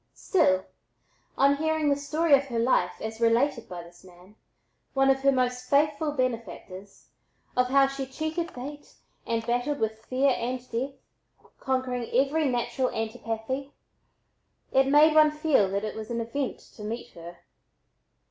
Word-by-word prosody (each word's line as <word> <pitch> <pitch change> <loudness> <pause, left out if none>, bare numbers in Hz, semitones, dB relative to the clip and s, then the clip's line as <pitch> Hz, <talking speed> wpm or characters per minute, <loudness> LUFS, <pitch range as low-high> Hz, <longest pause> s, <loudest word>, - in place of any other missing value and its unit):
Still, 190 - +2 0.7
on 280 +1 +4
hearing 315 0 +1
the 280 - +3
"story 300 +3 0
of 275 0 +6
her 245 -4 -4
life" 230 -7 +2
as 220 +1 -6
related 235 +2 +2
by 175 -1 -7
this 175 +1 -17
man, 180 +2 -17 0.6
one 270 0 +5
of 270 - +1
her 275 +1 +4
most 250 -1 -1
faithful 295 +1 +2
benefactors, 225 -7 -5 0.5
of 250 0 +3
how 275 +1 +5
she 270 0 -4
cheated 315 +5 -3
fate 290 +3 -9 0.3
and 230 -1 -1
battled 245 +5 -1
with 220 0 -2
fear 265 +2 +2
and 250 +2 -2
death, 255 +4 -2 0.7
conquering 255 -2 -2
every 280 +5 +2
natural 250 +1 -1
antipathy, 230 +4 -4 1.0
it 265 0 +4
made 300 +3 +6
one 310 0 +7
feel 300 -9 +2
that 200 +2 -2
it 215 - -4
was 220 -1 -7
an 235 -1 -2
event 250 +4 -3
to 210 - -14
meet 225 +3 -5
her. 170 +1 -11
255 Hz, 150 wpm, -27 LUFS, 225-280 Hz, 1.0 s, one